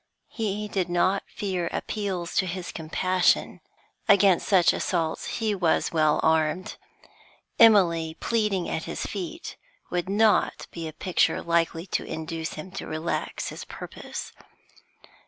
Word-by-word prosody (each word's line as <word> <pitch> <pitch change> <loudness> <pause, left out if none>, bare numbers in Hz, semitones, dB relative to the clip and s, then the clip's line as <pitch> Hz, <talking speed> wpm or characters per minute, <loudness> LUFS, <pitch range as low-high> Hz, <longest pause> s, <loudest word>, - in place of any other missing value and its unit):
He 210 -2 -2
did 190 -4 -1
not 185 +3 +2
fear 185 -4 -3
appeals 190 -5 -3
to 190 - +3
his 180 0 -4
compassion; 180 +3 +1 0.5
against 195 -3 +5
such 185 -4 +5
assaults 165 -3 -1
he 220 -2 0
was 175 -5 +1
well 155 -2 +3
armed. 160 +3 +1 0.8
Emily 170 -8 +5
pleading 210 -6 0
at - - -3
his - - -4
feet 335 -2 -6 0.3
would 180 +1 -1
not 215 +2 +2
be 165 -1 -5
a - - -5
picture 175 +3 +1
likely 170 0 0
to 185 - -2
induce 160 0 -5
him 155 +4 -8
to 195 - -6
relax 155 +2 -3
his - - -7
purpose. - - -8
180 Hz, 130 wpm, -26 LUFS, 165-200 Hz, 0.8 s, against